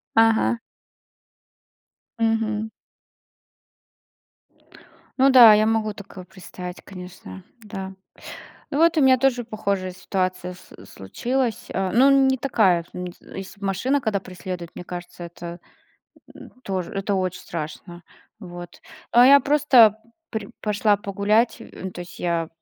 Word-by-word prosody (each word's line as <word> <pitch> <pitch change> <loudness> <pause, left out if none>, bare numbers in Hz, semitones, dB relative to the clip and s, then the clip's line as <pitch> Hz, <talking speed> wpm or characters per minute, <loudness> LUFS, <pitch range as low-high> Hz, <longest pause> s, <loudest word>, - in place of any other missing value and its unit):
Ага. 225 +1 +3 1.6
Мгм. 220 -1 0 2.5
Ну 270 +1 +5
да, 245 -4 +9
я 215 +1 +3
могу 220 -1 0
такое 200 -2 -11
представить, 180 -2 -9
конечно. 180 - -11 0.2
Да. 195 -3 -7 0.8
Ну, 280 - -2
вот 330 0 +4
у - - +4
меня 265 -2 +6
тоже 250 -1 +1
похожая 200 -4 -3
ситуация 185 0 -3
с 185 +1 -17
случилась, 240 - -3
а, 190 0 -1
ну, 255 +5 +5
н 275 -1 +5
не 265 - +2
такая, 210 -10 +2
м, 180 0 -6
если 195 +1 -10
б - - -7
машина 250 +9 0
когда 210 -3 -1
преследует, 180 -2 -7
мне - - -8
кажется 175 0 -8
это, 170 0 -9 0.8
м, - - -13
тоже, 190 -5 -4
это 195 +1 -1
очень 185 -1 -2
страшно. 170 +2 -7 0.4
Вот. 175 -4 -10 0.3
А 240 +1 +6
я 280 +1 +8
просто 260 -6 +5 0.3
при 220 -2 -5
пошла 210 0 +1
погулять, 205 +3 +1
э, 190 - -8
то 180 - -9
есть 175 - -13
я, 170 -2 -1
200 Hz, 130 wpm, -23 LUFS, 180-230 Hz, 2.5 s, да